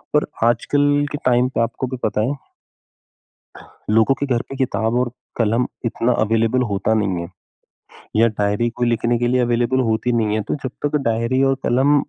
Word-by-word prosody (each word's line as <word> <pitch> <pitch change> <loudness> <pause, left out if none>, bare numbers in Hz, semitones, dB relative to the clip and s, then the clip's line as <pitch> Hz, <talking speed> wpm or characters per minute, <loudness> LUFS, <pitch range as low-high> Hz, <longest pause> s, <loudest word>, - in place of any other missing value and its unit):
और 150 - +3 0.2
आजकल 145 +5 +2
के 145 - -3
टाइम 125 0 +3
पे 125 - -1
आपको 115 +3 -2
भी 130 0 -5
पता 105 0 0
है - - -1 1.6
लोगों 115 +5 +4
के 140 - -3
घर 115 - 0
पे 135 - -7
किताब 120 -3 0
और 125 -1 0 0.3
कलम 115 +2 +2 0.2
इतना 115 +1 0
अवेलेबल 115 +3 +1
होता 105 +3 +1
नहीं 95 -5 0
है। 85 - -7 0.9
या 115 +2 +5
डायरी 105 +3 +1
कोई 120 +1 -2
लिखने 120 +1 +1
के 120 - +1
लिए 125 0 +2
अवेलेबल 120 +2 +1
होती 110 +3 0
नहीं 110 -2 +1
है। 110 - 0
तो - - +1
जब 130 - -3
तक 150 +1 0
डायरी 115 +3 +1
और 135 - +2
कलम 130 +4 +3
120 Hz, 185 wpm, -20 LUFS, 110-130 Hz, 1.6 s, या